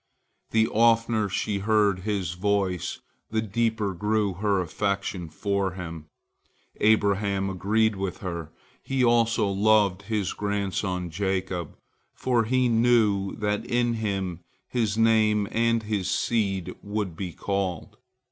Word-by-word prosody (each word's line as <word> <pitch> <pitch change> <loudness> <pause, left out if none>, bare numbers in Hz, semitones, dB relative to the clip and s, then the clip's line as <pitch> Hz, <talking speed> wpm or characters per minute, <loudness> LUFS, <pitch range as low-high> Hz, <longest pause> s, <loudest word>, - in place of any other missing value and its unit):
The 110 0 +3
oftener 115 -1 +3
she 100 +1 -1
heard 105 -2 +2
his 95 -3 -2
voice, 95 -1 -1 0.3
the 110 - 0
deeper 110 -1 0
grew 105 +2 0
her 100 +1 0
affection 95 0 -2
for 100 +3 -1
him. 85 -4 -7 0.7
Abraham 100 -2 +2
agreed 105 +4 +1
with 95 -1 -3
her. 85 -4 -5 0.3
He 135 -1 0
also 115 -2 +3
loved 100 -1 +3
his 105 -3 -2
grandson 95 -3 -2
Jacob, 95 -1 -2 0.4
for 120 -3 +1
he 130 +2 +2
knew 115 -4 +3
that 105 -1 -1
in 120 0 +1
him 100 -6 -2 0.3
his 110 -4 -1
name 110 -2 +3
and 115 0 +1
his 105 -3 -2
seed 100 -4 0
would 100 -4 -3
be 90 0 -4
called. 95 -2 -3
100 Hz, 120 wpm, -26 LUFS, 95-110 Hz, 0.7 s, The